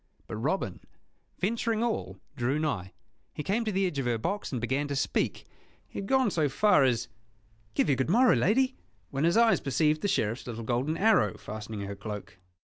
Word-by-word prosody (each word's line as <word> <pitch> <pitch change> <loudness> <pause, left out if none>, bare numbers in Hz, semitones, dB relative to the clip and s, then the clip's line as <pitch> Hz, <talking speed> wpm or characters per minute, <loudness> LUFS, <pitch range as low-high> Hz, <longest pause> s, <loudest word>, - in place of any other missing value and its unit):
But 110 - -6
Robin, 155 - -1 0.6
venturing 225 +3 0
all, 235 -2 -2 0.2
drew 130 +2 0
nigh. 135 -12 -2 0.4
He 150 - -4
came 215 +7 0
to 215 - 0
the 195 0 +1
edge 165 -6 -2
of 130 - -1
her 120 -1 +1
box, 195 - -3
and 125 - -2
began 135 +5 -1
to 140 - -3
speak. 135 - -1 0.4
He - - -7
had 195 - -5
gone 260 -4 +3
so 155 -4 +1
far 205 +1 +4
as 120 -2 +1 0.7
"Give - - +2
you 140 - +3
good 130 +3 -1
morrow, 245 +6 +5
lady," 260 +6 +2 0.4
when 140 +3 0
his 170 +6 +3
eyes 230 -1 +5
perceived 150 +3 +1
the - - 0
Sheriff's 120 - -1
little 115 -1 -5
golden 130 +7 -1
arrow 180 - +3
fastening 105 0 -7
her 100 0 -5
cloak. 100 -2 -7
145 Hz, 195 wpm, -29 LUFS, -, 0.7 s, morrow